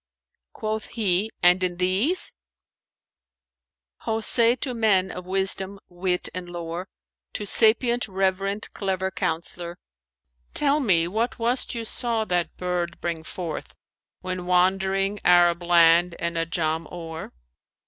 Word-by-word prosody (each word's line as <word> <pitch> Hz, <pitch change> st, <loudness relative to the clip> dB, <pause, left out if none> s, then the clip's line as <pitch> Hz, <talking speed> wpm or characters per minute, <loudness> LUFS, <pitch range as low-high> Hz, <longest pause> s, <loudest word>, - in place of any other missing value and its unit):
Quoth 215 Hz, 0 st, -4 dB
he, 205 Hz, -2 st, +1 dB
"And 180 Hz, +1 st, +5 dB
in 175 Hz, -1 st, -1 dB
these, 195 Hz, -, +2 dB, 1.6 s
'Ho 225 Hz, -1 st, -2 dB
say 230 Hz, +2 st, +4 dB
to 255 Hz, +1 st, -4 dB
men 200 Hz, -5 st, +2 dB
of 180 Hz, 0 st, -8 dB
wisdom, 190 Hz, +1 st, 0 dB
wit 180 Hz, 0 st, -2 dB
and 180 Hz, -1 st, -6 dB
lore 175 Hz, +1 st, -6 dB, 0.2 s
* -, -, -64 dB
To 210 Hz, -, -3 dB
sapient, 235 Hz, +4 st, +4 dB
reverend, 195 Hz, +1 st, -2 dB
clever 190 Hz, -1 st, -2 dB
counsellor: 170 Hz, 0 st, -4 dB, 0.8 s
Tell 290 Hz, 0 st, +2 dB
me 175 Hz, -, +2 dB
what 220 Hz, +6 st, -2 dB
was't 240 Hz, +2 st, 0 dB
you 230 Hz, -1 st, -4 dB
saw 230 Hz, -1 st, -1 dB
that 175 Hz, -3 st, -2 dB
bird 180 Hz, -1 st, -3 dB
bring 170 Hz, -2 st, -3 dB
forth 165 Hz, 0 st, -6 dB, 0.2 s
* -, -, -68 dB
When 185 Hz, -1 st, -4 dB
wandering 195 Hz, +2 st, +1 dB
Arab 175 Hz, -1 st, +5 dB
land 170 Hz, 0 st, +4 dB
and 170 Hz, 0 st, -3 dB
Ajam 165 Hz, -1 st, -1 dB
o'er? 165 Hz, -2 st, -7 dB
185 Hz, 130 wpm, -24 LUFS, 175-215 Hz, 1.6 s, And